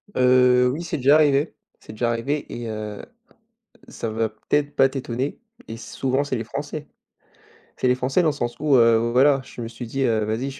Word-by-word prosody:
Heu, 125 0 +4
oui 165 - -5
c'est 170 - -3
déjà 140 +3 +5
arrivé 145 0 +3 0.2
c'est - - -12
déjà 120 +2 -1
arrivé 135 +6 -2
et 120 -1 -5
heu, 105 -1 -6 0.9
ça 115 - -5
va 110 0 -1
peut-être 145 +7 -2
pas 135 - +5
t'étonner 130 0 -4 0.3
et 115 - -6
souvent 130 +4 -2
c'est 130 -3 -2
les 115 - -4
Français. 145 +5 -6 0.9
C'est - - 0
les 125 - +3
Français 130 +7 +1
dans 165 - +3
le - - +1
sens 120 -4 -3
où, 145 -2 +3
heu, 115 -2 +5
voilà, 135 +2 +4
je 125 - -13
me 115 - -4
suis 120 +2 -8
dit, 135 +4 -2
heu, 110 -4 +1
vas-y 110 +4 -2
125 Hz, 200 wpm, -23 LUFS, 115-140 Hz, 0.9 s, déjà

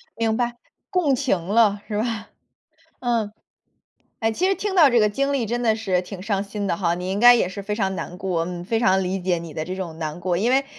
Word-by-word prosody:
明 225 0 0
白。 240 -1 -1 0.4
共 340 -7 +2
情 250 -9 0
了， 205 +3 +2
是 210 - -3
吧？ 220 0 -2 0.7
嗯。 230 -4 0 0.9
哎， 225 -1 +1
其 365 +12 0
实 390 - +2
听 405 -1 -3
到 315 -7 +7
这 240 -1 +4
个 210 - +4
经 275 +6 0
历 255 -5 0
真 240 +3 -2
的 225 -2 +2
是 190 -5 0
挺 185 0 -9
伤 200 -1 -1
心 205 0 -5
的 - - 0
哈， 170 -3 +1
你 180 +1 -4
应 195 - -1
该 245 +1 +9
也 225 - +1
是 200 - -6
非 210 +1 -3
常 195 -3 -1
难 180 +1 -6
过， 180 -4 -1
嗯， 175 -1 -5
非 225 +4 0
常 190 -4 +3
理 185 +1 -2
解 180 -1 0
你 165 -2 -9
的 155 - -3
这 185 - -4
种 175 -4 -6
难 155 +1 -4
过。 175 -1 -1
因 225 +6 +1
为， 270 +1 +3
205 Hz, 260 characters per minute, -23 LUFS, 185-235 Hz, 0.9 s, 该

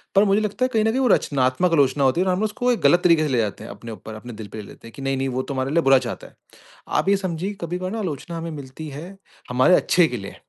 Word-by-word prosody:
पर 195 - +6
मुझे 200 +1 +3
लगता 215 +4 -1
है 255 - -1
कहीं 220 -1 +3
न - - +3
कहीं 260 - -1
वो 255 - +3
रचनात्मक 140 - +2
आलोचना 140 -1 +3
होती 135 +7 +2
है। 190 - 0
और 185 - +3
हम 180 - -1
ना 215 - +1
उसको 245 +4 0
एक - - -4
गलत 175 - +4
तरीके 165 -3 +5
से - - -3
ले - - +2
जाते 105 -3 -2
हैं - - -8
अपने 115 +3 -9
ऊपर 110 +1 -9
अपने 120 +2 -9
दिल 110 -1 -8
पे 110 - -5
ले - - -12
लेते 115 - -13
हैं 115 - -13
कि - - -9
नहीं, 135 0 -1
नहीं 135 0 -1
वो 130 0 -1
तो 140 - -5
हमारे 130 +1 -2
लिए 170 +1 +3
बुरा 135 0 +6
चाहता - - -7
है। - - -21 0.5
आप 195 - 0
ये 200 - +4
समझिए 185 +1 -3
कभी-कभार 180 +4 -3
आलोचना 170 -3 -4
हमें 165 0 -5
मिलती 145 +1 -8
है, 165 +8 -9 0.3
हमारे 130 +9 +4
अच्छे 175 -2 +3
के 125 - -4
लिए 100 -2 -8
155 Hz, 305 wpm, -22 LUFS, 130-185 Hz, 0.5 s, पर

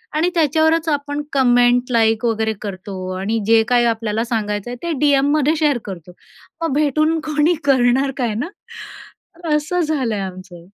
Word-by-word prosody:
आणि 325 +3 +2
त्याच्यावरच 320 +1 +2
आपण 290 0 -2
कमेंट, 245 -1 +3
लाइक 225 -1 +2
वगैरे 220 -1 0
करतो 195 -1 -7 0.2
आणि 215 +4 -1
जे 225 0 +5
काही 245 -1 +3
आपल्याला 225 -1 -1
सांगायचं 215 -2 -3
आहे - - -5
ते 340 - -2
डीएममध्ये 290 +1 +2
शेअर 295 -4 +2
करतो. 180 -3 -8 0.5
मग 330 -4 -1
भेटून 305 +2 +1
कोणी 305 +3 +2
करणार 265 0 +3
काय 240 -5 -1
ना, 255 - -3 1.1
असं 305 +4 -1
झालंय 270 -10 -1
आमचं. 185 -2 -9
245 Hz, 145 wpm, -19 LUFS, 220-300 Hz, 1.1 s, जे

